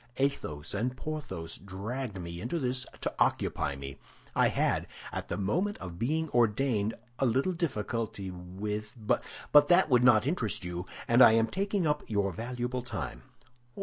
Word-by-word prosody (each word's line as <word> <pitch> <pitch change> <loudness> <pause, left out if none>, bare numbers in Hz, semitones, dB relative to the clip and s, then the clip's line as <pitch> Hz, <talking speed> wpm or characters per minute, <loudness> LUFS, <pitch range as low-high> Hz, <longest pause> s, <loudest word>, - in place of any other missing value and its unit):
Athos 85 - -1
and 125 +5 -1
Porthos 145 - -5
dragged 100 +3 -5
me 85 0 -6
into 125 +9 -2
this 130 -3 -1
to - - -1
occupy 70 - +1
me. 70 0 -8 0.4
I - - +5
had, - - +1 0.3
at - - -4
the - - -3
moment 175 - 0
of 85 -2 -8
being 155 +7 0
ordained, 115 -2 +2 0.2
a 135 - +3
little 135 +10 +2
difficulty 115 - -2
with—But 105 +5 -3 0.5
that 175 -2 +5
would 125 -1 +5
not 120 -3 +6
interest 125 - -1
you, 90 +1 -4 0.2
and 120 +2 +5
I 110 - +9
am 115 0 +4
taking 195 - -1
up 150 -1 +1
your 100 -2 +1
valuable 125 +5 -3
time." 125 - -5
115 Hz, 150 wpm, -30 LUFS, 100-135 Hz, 0.5 s, I